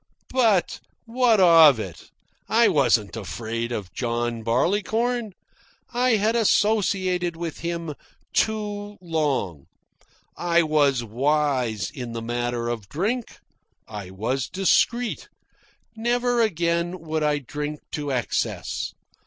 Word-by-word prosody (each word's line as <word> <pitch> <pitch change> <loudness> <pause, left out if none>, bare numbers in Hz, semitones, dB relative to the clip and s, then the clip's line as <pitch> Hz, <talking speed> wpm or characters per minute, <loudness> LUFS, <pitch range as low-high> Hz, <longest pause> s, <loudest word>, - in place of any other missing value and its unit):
But 225 -9 +2 0.3
what 235 -2 +3
of 165 -8 +7
it? 95 -6 -8 0.4
I 230 0 +5
wasn't 125 - +2
afraid 115 +4 -4
of 105 -6 -5
John 120 -1 -2
Barleycorn. 210 - 0 0.6
I 245 0 +3
had 215 +2 +1
associated 195 -5 +2
with 165 -1 -5
him 170 -2 -3 0.4
too 205 -1 -1
long. 145 - -2 0.7
I 170 -1 +2
was 145 -5 +2
wise 125 - 0
in 125 -5 -7
the 115 - -4
matter 120 0 -2
of 115 -5 -4
drink. 220 - -3 0.5
I 105 -4 -7
was 115 +7 -2
discreet. 235 +5 +1 0.7
Never 240 +1 +1
again 170 -3 0
would 160 -1 -2
I 150 -1 +2
drink 150 +2 -5
to 145 -2 -3
excess. 125 -3 -2
160 Hz, 110 wpm, -24 LUFS, -, 0.7 s, of